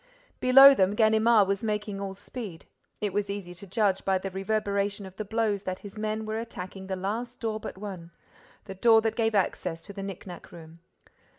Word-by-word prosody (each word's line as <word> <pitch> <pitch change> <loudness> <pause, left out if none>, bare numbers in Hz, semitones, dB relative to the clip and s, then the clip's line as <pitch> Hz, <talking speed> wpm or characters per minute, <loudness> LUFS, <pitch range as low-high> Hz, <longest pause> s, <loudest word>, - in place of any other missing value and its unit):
Below 270 +2 +9
them, 195 -4 +2
Ganimard 220 -1 +4
was 195 +1 -1
making 210 -2 -2
all 195 -1 -5
speed. 200 -4 -8 0.4
It 205 -3 -1
was 205 0 -1
easy 200 -3 -5
to 195 +3 -11
judge 195 0 +1
by 190 -1 +2
the 190 +1 -5
reverberation 200 0 -1
of 190 -1 -11
the 215 - -4
blows 215 -1 0
that 185 -2 -5
his 205 0 -10
men 215 0 -3
were 215 +1 -3
attacking 190 -4 -7
the 190 - -2
last 225 +6 -4
door 220 -2 -2
but 205 - -7
one, 190 -4 -7 0.6
the 195 - -7
door 225 +3 +5
that 225 - 0
gave 225 -2 +1
access 180 -3 -1
to 200 - -9
the 200 - -6
knicknack 190 -2 -8
room. 165 0 -13
200 Hz, 195 wpm, -27 LUFS, 190-220 Hz, 0.6 s, Below